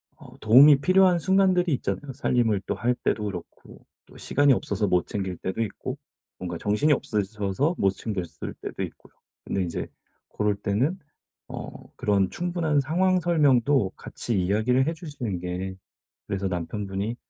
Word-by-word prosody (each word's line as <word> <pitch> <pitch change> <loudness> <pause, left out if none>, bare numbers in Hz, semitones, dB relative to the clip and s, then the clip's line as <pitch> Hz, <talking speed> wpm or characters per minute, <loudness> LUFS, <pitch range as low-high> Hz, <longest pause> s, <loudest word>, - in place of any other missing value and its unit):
어 - - -15
도움이 135 +6 +7
필요한 185 +1 +4
순간들이 185 -1 +3
있잖아요. 120 +5 -4
살림을 120 -6 +1
또 - - -2
할 125 +1 0
때도 105 -3 -1
그렇고 90 -4 -9 0.2
또 - - -17
시간이 145 -1 +3
없어서 105 -3 -1
못 90 -2 +1
챙길 95 -3 -3
때도 95 +4 -3
있고 105 - -5 0.4
뭔가 85 -2 -5
정신이 105 - +2
없으셔서 105 - -1
못 95 -1 +3
챙겼을 95 -5 -5
때도 - - -4
있고요. - - -10 0.3
근데 95 - -1
인제 85 -2 -4 0.4
고럴 105 -1 0
때는 105 - 0 0.5
어 - - -7 0.2
그런 100 -2 +1
충분한 170 -4 0
상황 180 +6 +2
설명도 140 - +3
같이 115 -5 -3
이야기를 110 +8 +2
해 165 - 0
주시는 140 - -5
게 90 +2 -4 0.5
그래서 100 0 -2
남편분이 95 +4 -3
110 Hz, 325 characters per minute, -25 LUFS, 95-145 Hz, 0.5 s, 도움이